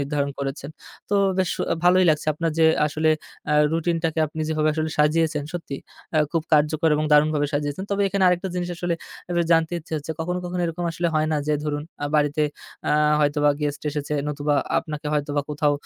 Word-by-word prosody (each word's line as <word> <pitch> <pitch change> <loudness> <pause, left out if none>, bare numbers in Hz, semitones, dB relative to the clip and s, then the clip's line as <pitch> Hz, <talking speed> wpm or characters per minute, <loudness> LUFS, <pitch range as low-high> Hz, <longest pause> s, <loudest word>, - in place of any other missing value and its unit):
নির্ধারণ 140 0 -1
করেছেন। 140 +1 -4 0.4
তো 205 - +2 0.2
বেশ 185 -2 +1
অ - - 0 0.2
ভালোই 185 +1 +5
লাগছে 155 0 -1
আপনার 165 +1 -1
যে 160 - +6 0.2
আসলে 155 +1 +1 0.4
আ - - +3 0.2
রুটিনটাকে 165 -1 0
আপনি 155 +2 -7
যেভাবে 155 -1 +1
আসলে 155 0 -1
সাজিয়েছেন। 155 0 +2
সত্যি, 165 -6 -5 0.4
অ্যা 155 - +3
খুব 165 -2 +1
কার্যকর 155 +2 +3
এবং 155 - 0
দারুণভাবে 150 0 +4
সাজিয়েছেন। 145 +5 -2
তবে 200 0 +1
এখানে 195 0 +1
আরেকটা 180 +2 0
জিনিস 180 0 -2
আসলে 175 0 -1 0.4
একটু 175 -1 +2
জানতে 165 0 +2
ইচ্ছে 160 - -14
হচ্ছে, 155 +2 -4
কখনো, 180 +2 -2
কখনো 180 0 -3
এরকম 170 +1 -4
আসলে 170 +1 0
হয় 155 0 +2
না? - - +2
যে 150 - +2
ধরুন, 145 -1 -2 0.2
আ - - 0
বাড়িতে 150 0 +2 0.5
আ - - +3 0.3
হয়তোবা 145 0 +3
গেস্ট 145 -1 -2
এসেছে। 150 0 -3
নতুবা 145 0 0 0.2
আপনাকে 150 -1 -5
হয়তোবা 145 -1 0
কোথাও 150 0 +1
155 Hz, 190 wpm, -23 LUFS, 150-165 Hz, 0.5 s, যে